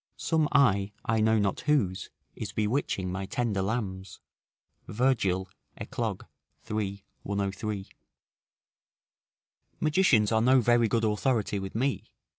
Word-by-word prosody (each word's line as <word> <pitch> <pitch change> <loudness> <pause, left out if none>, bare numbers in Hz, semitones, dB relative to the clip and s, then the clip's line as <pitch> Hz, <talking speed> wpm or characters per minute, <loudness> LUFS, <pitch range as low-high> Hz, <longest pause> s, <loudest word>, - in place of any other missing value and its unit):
["Some 160 -3 +1
eye, 105 -8 +3
I 110 0 +1
know 110 +1 +3
not 100 -2 0
whose 115 -12 0 0.3
is - - -6
bewitching 105 -4 -1
my 95 +1 -4
tender 110 -5 -1
lambs." 95 -2 -3 0.7
Virgil, 105 -6 +1 0.3
Eclog., - - -4 0.5
iii. 100 -2 -3 0.2
103.] 100 0 -3 1.9
Magicians 150 - +3
are 110 0 +3
no 130 +3 +5
very 120 -1 +3
good 115 +1 +1
authority 105 -1 0
with 95 +1 -7
me. 135 +4 -1
110 Hz, 110 wpm, -28 LUFS, 100-125 Hz, 1.9 s, no